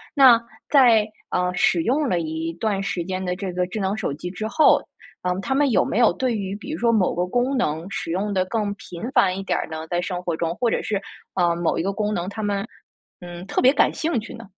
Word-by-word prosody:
那， 255 -4 +8 0.3
在， 235 -7 +5 0.2
呃， 180 0 0
使 175 -2 +3
用 280 +4 +1
了 175 - +1
一 160 0 -3
段 195 +2 -1
时 180 -3 -2
间 185 +1 -4
的 180 0 -1
这 190 -1 -4
个 180 0 0
智 210 +4 -5
能 195 +1 0
手 180 - -2
机 175 +4 -6
之 215 +3 -4
后， 310 +7 +4 0.4
嗯， 180 +1 -1
他 265 - -1
们 285 0 +3
有 - - +4
没 - - -2
有 235 - +6
对 255 -3 -1
于 195 -1 -3
比 245 +8 -8
如 315 - -4
说 235 -1 +3
某 200 -5 +2
个 175 - 0
功 245 +6 0
能 160 -5 -1
使 - - -4
用 200 +3 -1
地 185 -1 +2
更 205 0 -1
频 175 -3 -10
繁 190 -7 +3
一 195 - -4
点 - - 0
儿 - - -4
呢？ 160 0 -5
在 175 +1 -1
生 180 0 -3
活 170 -2 -1
中， 165 +1 -2
或 240 - +1
者 - - 0
是， 205 -2 -1 0.4
呃， 175 -2 +2
某 170 -1 0
一 - - 0
个 195 +2 -1
功 210 0 -1
能， 180 -2 -2
他 220 +2 -6
们， 205 0 -1 0.5
嗯， 175 0 -9
特 - - 0
别 255 +1 +6
感 - - +3
兴 315 -6 -1
趣 215 - -9
呢？ 230 -1 -10
195 Hz, 270 characters per minute, -23 LUFS, 180-225 Hz, 0.5 s, 那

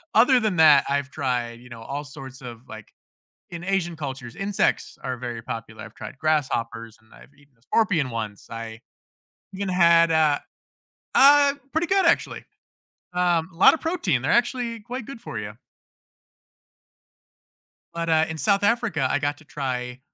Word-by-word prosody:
other 250 +3 +6
than 215 -5 0
that, 155 -3 +7
I've 140 -1 -1
tried, 125 -5 -2
you 125 +1 -15
know, 115 -2 -10
all 140 +5 -5
sorts 135 -2 -11
of, 120 -3 -9
like 110 -1 -10 0.6
in 170 0 -7
Asian 180 -3 -1
cultures, 135 -5 -7
insects 195 0 -1
are 130 - -3
very 120 -1 -6
popular, 115 -2 -7
I've - - -13
tried - - -9
grasshoppers, 115 -7 -1
and 110 - -27
I've 140 - -17
eaten 140 -1 -25
a - - -35
scorpion 175 - +1
once. 110 -3 -6
I 115 0 -7 0.8
even 195 0 -3
had 170 -2 +5
a 155 -2 +3 0.7
Uh, 285 +1 +7 0.2
pretty 320 +2 +1
good, 385 0 +2
actually, 335 - +1 0.7
um, 175 -2 +1
a - - -19
lotta 180 - +7
of - - -17
protein, 265 - 0
they're 145 - +1
actually 240 -1 0
quite 240 +2 -7
good 270 -4 -9
for 115 - -6
you. 105 0 -7 2.4
But, 170 0 -4
uh, 160 -1 +4
in 160 0 -5
South 200 +3 +2
Africa, 205 - +1
I - - +2
got 145 0 -2
to - - -18
try 125 -3 -4
150 Hz, 165 wpm, -24 LUFS, 125-195 Hz, 2.4 s, that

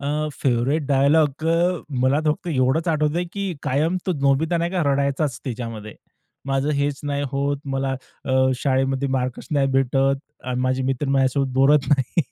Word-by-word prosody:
अ, 150 +2 -1
favourite 130 +4 +1
dialogue 145 +2 +2
अ, 170 +1 +1 0.2
मला 130 +3 +3
फक्त 155 +4 0
एवढंच 135 +3 +1
आठवतंय, 155 +2 +1
की 190 +1 -4
कायम 155 +7 +1
तो 185 - +1
नोबित 140 +4 +2
नाही 170 +1 -1
का, 180 -2 0
रडायचाच 140 -1 0
त्याच्यामध्ये. 115 -4 -6 0.5
माझं 135 +1 0
हेच 140 0 -1
नाही 145 0 -1
होत. 140 +1 0 0.2
मला 135 0 -1 0.3
अ, 130 - 0 0.2
शाळेमध्ये 135 +1 0
मार्कच 125 0 -4
नाही 140 -3 +2
भेटत 135 +1 +2 0.3
आणि 125 0 -2
माझे 130 +1 0
मित्र 135 +1 -1
माझ्यासोबत 135 0 +1
बोलत 135 +2 +4
नाही. 140 +2 +2
140 Hz, 155 wpm, -22 LUFS, 130-150 Hz, 0.5 s, बोलत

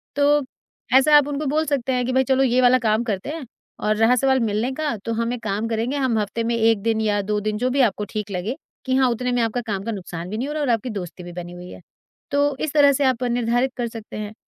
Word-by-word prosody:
तो 290 +1 +4 0.6
ऐसा 295 +3 +5
आप 290 - +3
उनको 290 +1 -3
बोल 305 +3 +1
सकते 270 -4 -1
हैं 250 -1 0
कि, 255 - -1
"भाई 265 0 +4
चलो, 265 0 +2
ये 255 0 +3
वाला 250 +1 +6
काम 215 +2 +2
करते 210 +1 -3
हैं 310 -3 -5 0.3
और 215 0 +1
रहा 225 +3 +4
सवाल 265 +1 +2
मिलने 225 +2 0
का, 300 -4 -2
तो 230 +3 -4
हम 230 +2 -1
एक 235 -2 -7
काम 210 +2 -1
करेंगे, 230 +5 -1
हम 255 -5 +1
हफ़्ते 210 +3 -2
में 235 +1 0
1 225 -2 +3
दिन 225 0 0
या 205 -2 +1
2 210 +1 -1
दिन" 210 0 -2
जो 250 +3 0
भी 270 +1 +2
आपको 210 +1 -6
ठीक 210 -2 -4
लगे, 195 +8 -3 0.3
कि 260 0 +1
हाँ, 260 -1 +4
उतने 250 +1 -1
में 245 -1 +1
आपका 230 +2 0
काम 195 -2 -2
का 230 - -3
नुकसान 175 -3 -6
भी 215 - -4
नहीं 260 +4 -2
हो 295 - -4
रहा 305 - -2
और 275 - 0
आपकी 230 +1 0
दोस्ती 180 -4 -6
भी 175 - -8
बनी 175 0 -7
हुई 180 0 -10
है। - - -11 0.5
तो 285 0 +2
इस 310 - -2
तरह 285 -2 +6
से 280 - 0
आप 255 -1 +1
निर्धारित 245 +1 +1
कर 240 -1 -1
सकते 225 -2 -9
हैं 210 0 -5
235 Hz, 275 wpm, -22 LUFS, 215-265 Hz, 0.6 s, वाला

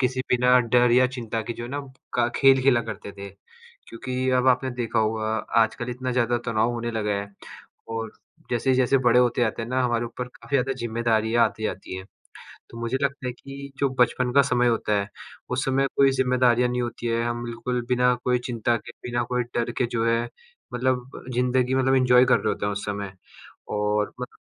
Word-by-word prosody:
किसी 130 0 0
बिना 125 +1 +5
डर 125 0 +3
या 130 +1 +5
चिंता 115 -2 -3
के 115 - -4
जो 120 - -7
है 120 - -7
ना, 145 +2 -3 0.4
क 120 -1 +3
खेल 135 -1 +5
खेला 130 -3 +4
करते 105 -2 -7
थे 100 0 -9 0.6
क्योंकि 130 +2 -3
अब 125 - +1
आपने 130 +1 +2
देखा 120 -2 -2
होगा 110 0 0 0.3
आजकल 120 +2 -3
इतना 130 +1 -4
ज़्यादा 120 -1 +1
तनाव 115 +1 +1
होने 120 0 -3
लगा 110 -2 -2
है 100 - -7 0.6
और 115 -1 -3 0.4
जैसे-जैसे 130 +2 +2
बड़े 125 -1 +4
होते 120 0 +1
जाते 115 0 -1
हैं 115 - -6
ना, 130 +1 0
हमारे 120 -1 0
ऊपर 120 +1 -5
काफ़ी 140 +2 -3
ज़्यादा 135 0 0
ज़िम्मेदारियाँ 115 0 +1
आती 110 - -3
जाती 95 -3 -4
हैं, 95 - -7 0.7
तो 115 - -10
मुझे 115 +2 -1
लगता 140 -1 -1
है 125 - -2
कि 140 +2 -10
जो 140 - +2
बचपन 125 0 +2
का 140 - +6
समय 125 -3 +1
होता 115 -2 0
है, 100 - -5 0.4
उस 125 +1 -1
समय 135 +1 +1
कोई 140 -1 +5
ज़िम्मेदारियाँ 125 -2 +2
नहीं 125 0 -1
होती 120 0 -5
हैं, 115 0 0
हम 120 0 -3
बिल्कुल 120 +1 -3
बिना 125 0 +3
कोई 125 0 +2
चिंता 120 -1 0
के, - - -10 0.2
बिना 120 0 0
कोई 125 0 +2
डर 120 0 0
के 125 - +2
जो 115 -1 -1
है, 115 +1 +1 0.5
मतलब 125 0 -1 0.2
जिंदगी 125 +1 +1
मतलब 130 0 +2
इंजॉय 125 -1 +5
कर 125 - +4
रहे - - -1
होते - - -3
हैं 105 - -1
उस 100 0 -5
समय 100 -1 -4 0.6
और 105 0 0
मतलब - - -7
120 Hz, 205 wpm, -24 LUFS, 115-125 Hz, 0.7 s, का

